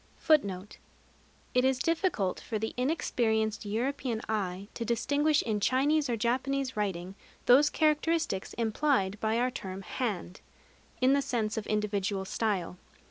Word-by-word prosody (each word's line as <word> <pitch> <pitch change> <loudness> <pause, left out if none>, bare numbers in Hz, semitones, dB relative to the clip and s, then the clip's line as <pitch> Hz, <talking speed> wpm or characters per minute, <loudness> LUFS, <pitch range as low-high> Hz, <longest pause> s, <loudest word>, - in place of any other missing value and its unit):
It 250 - +3
is 265 0 +3
difficult 325 - 0
for 220 - -4
the 220 +1 -3
inexperienced 225 -6 0
European 240 +1 -2
eye 195 -3 -2
to 235 - -4
distinguish 285 +7 +2
in 215 -2 -1
Chinese 285 +6 +2
or 235 - 0
Japanese 260 +4 0
writing 190 -3 -2 0.3
those 275 +4 +6
characteristics 310 - +1
implied 220 -3 +1
by 220 +1 +1
our 250 +1 +1
term 190 -5 -6
"hand" 195 -6 -4 0.6
in 260 +2 +5
the 280 - +3
sense 225 -5 -1
of 220 - -4
individual 205 -2 -1
style. 190 -4 -2
230 Hz, 130 wpm, -30 LUFS, 205-270 Hz, 0.6 s, those